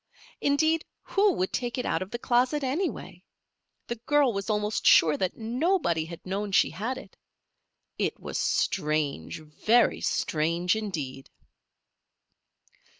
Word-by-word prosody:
Indeed, 315 +3 +2 0.2
who 405 +1 +3
would 185 - -2
take 245 -1 -2
it 250 - -2
out - - 0
of 185 - -5
the 235 - -4
closet, 255 +5 +1
anyway? 295 +9 -3 0.6
The 235 - -4
girl 290 -4 +4
was 200 +2 -4
almost 210 0 0
sure 155 -2 +6
that 185 -2 -2
nobody 240 - 0
had 170 0 -10
known 195 +2 -3
she - - +4
had 225 +10 -3
it. 265 - -12 0.8
It - - -1
was - - -4
strange, 150 - -1
very 215 +10 +2
strange 170 +5 0
indeed. 150 -11 -5
210 Hz, 130 wpm, -27 LUFS, 170-260 Hz, 0.8 s, sure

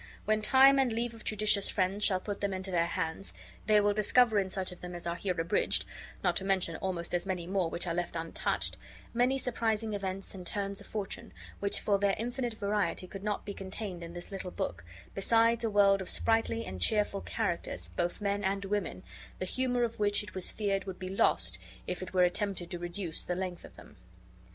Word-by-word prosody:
When 215 +1 +2
time 270 +4 +7
and 260 -3 +3
leave 230 +1 -1
of 225 - -12
judicious 210 -1 +3
friends 195 +2 0
shall 185 -2 +4
put 200 +1 -5
them 200 -1 0
into 190 0 -4
their 170 -1 +2
hands, 170 +2 -3 0.3
they 215 -1 +6
will 205 0 +3
discover 215 +1 +4
in 190 -1 -1
such 185 -1 -3
of 180 - -11
them 180 0 -6
as 175 - -6
are 170 0 -1
here 180 -1 -2
abridged 165 +1 +2 0.4
(not 180 -2 +3
to - - 0
mention 190 -4 +1
almost 180 -3 -2
as 175 +2 0
many 180 -3 -2
more, 185 -2 0
which 170 +2 -1
are 170 - -1
left 175 0 -2
untouched) 165 0 -1 0.4
many 250 +3 +3
surprising 225 -4 0
events 195 -1 -3
and 180 -3 -7
turns 200 0 -2
of - - -12
fortune, 205 -3 -4 0.3
which 200 0 0
for 200 -1 +2
their 200 -1 +3
infinite 240 +1 -2
variety 205 -2 0
could 195 +1 -8
not 210 -1 -2
be 205 - -4
contained 190 -1 -6
in 170 0 -7
this 175 +3 -8
little 190 -2 -4
book, 85 - -3 0.3
besides 230 +3 +3
a 225 - +2
world 200 -1 +5
of 190 - -4
sprightly 225 0 +2
and 95 - -6
cheerful 205 - +2
characters, 170 - -2
both 175 - -2
men 200 0 0
and 195 +1 0
women, 200 -2 -2 0.3
the 185 - -3
humor 245 +4 +1
of 230 -2 -2
which 205 0 +2
it 205 - -10
was 185 -1 0
feared 195 -3 -1
would 190 -2 -5
be 185 -1 -5
lost 90 - +2 0.3
if 180 0 -3
it 185 - -6
were 185 -1 +4
attempted 180 -1 0
to 175 - -3
reduce 175 -1 -2
the 180 - -2
length 185 -1 -4
of - - -12
them. - - -14
195 Hz, 215 wpm, -31 LUFS, 180-210 Hz, 0.4 s, time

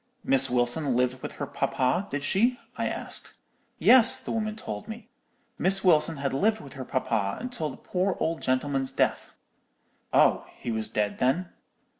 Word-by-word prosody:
"'Miss 135 0 +5
Wilson 125 +3 +1
lived 125 +1 0
with - - -6
her - - -5
papa, 135 +10 -1
did 145 0 -4
she?' 230 - +2 0.2
I - - -2
asked. - - -5 0.4
"'Yes,' 255 -3 +7
the - - -7
woman 215 -1 -2
told 105 - -7
me; 225 +2 -9 0.5
'Miss 195 +1 +3
Wilson 165 -3 +3
had 140 -1 -2
lived 215 +10 +1
with 140 - -12
her 135 - -7
papa 115 - -2
till 160 -11 -3
the 130 - -10
poor 185 +1 -2
old 165 0 -2
gentleman's 135 +1 -1
death.' - - 0 0.8
"'Oh, - - +3
he 120 - -5
was 110 -1 -3
dead, 105 -1 -2
then?' 165 +9 0
140 Hz, 165 wpm, -26 LUFS, 125-190 Hz, 0.8 s, Yes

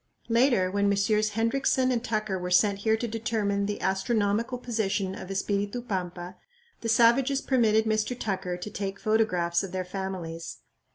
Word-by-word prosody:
Later, 230 -6 +3
when 200 0 +2
Messrs. 210 +1 +1
Hendriksen 255 +2 +2
and 240 -2 -1
Tucker 215 -5 -1
were 180 0 -4
sent 200 +2 +3
here 220 +2 +2
to 235 - -3
determine 210 -3 -1
the 205 - -3
astronomical 205 +4 0
position 205 -6 -1
of 190 - -8
Espiritu 200 +3 -1
Pampa, 185 -5 -5 0.4
the 230 - -4
savages 245 +4 +4
permitted 225 -5 +2
Mr. 220 +3 -1
Tucker 190 -4 -2
to 180 +4 -6
take 200 -1 -4
photographs 185 -6 +1
of 195 -2 -6
their 185 -1 -2
families. 180 -3 -5
205 Hz, 155 wpm, -27 LUFS, 190-230 Hz, 0.4 s, savages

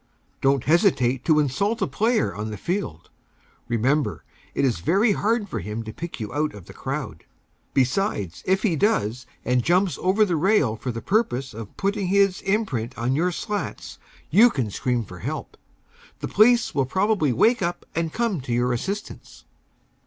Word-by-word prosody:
Don't 135 -1 +2
hesitate 135 - +2
to 155 -2 +4
insult 200 - 0
a 195 - +1
player 220 - +1
on 105 +1 -4
the 105 - -5
field. 95 - -4 0.6
Remember, 130 +6 0 0.3
it - - +2
is 120 -9 0
very 195 - +3
hard 210 +2 0
for 115 - -4
him 105 +5 -5
to 110 -1 -8
pick 170 -4 -7
you 110 0 -5
out 150 -3 -1
of 100 -4 -11
the - - -12
crowd. - - -5 0.5
Besides, 130 - 0
if 190 +1 +2
he 190 -7 +2
does, 130 - 0 0.2
and 125 0 +2
jumps 180 +6 +2
over 195 +4 +3
the 180 -4 0
rail 155 - +3
for 125 +3 -4
the 115 0 -6
purpose 135 - 0
of 110 -1 -9
putting 200 -1 -1
his 195 0 +3
imprint 145 - -1
on 120 +3 0
your 175 +5 +1
slats, 210 +4 -5 0.3
you 235 +4 +7
can 125 - -2
scream 120 +1 -1
for 90 -1 -11
help. - - -5 0.6
The - - -4
police 235 +3 +4
will 135 -3 +1
probably 190 -3 +1
wake 225 - +3
up 175 -1 -2
and 165 -1 -1
come 220 - -1
to 125 - -6
your 120 +1 +1
assistance. 195 - -6
155 Hz, 175 wpm, -24 LUFS, 120-200 Hz, 0.6 s, you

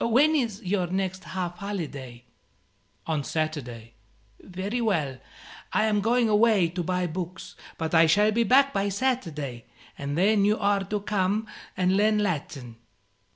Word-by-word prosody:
When 275 +7 +4
is 230 -7 -1
your 185 -1 0
next 190 +1 -3
half 180 -1 -4
holiday?" 145 - -6 0.8
"On 155 -3 -1
Saturday." 130 -8 -4 0.5
"Very 195 +6 -4
well. 155 - 0 0.5
I - - +3
am 210 -2 +1
going 235 +2 +2
away 210 -4 +4
to 175 +2 -4
buy 180 +1 -1
books; 175 +2 -6 0.2
but 160 -1 -3
I 165 0 +6
shall 210 +6 +4
be 230 +2 +1
back 275 +3 +4
by 200 -2 0
Saturday, 165 - -2 0.3
and 140 +1 -4
then 200 +3 +3
you 210 +2 +3
are 200 -1 +1
to 210 +2 -3
come 205 +1 0 0.3
and 185 0 +2
learn 210 +1 +3
Latin." 145 - -3
190 Hz, 150 wpm, -26 LUFS, 160-210 Hz, 0.8 s, I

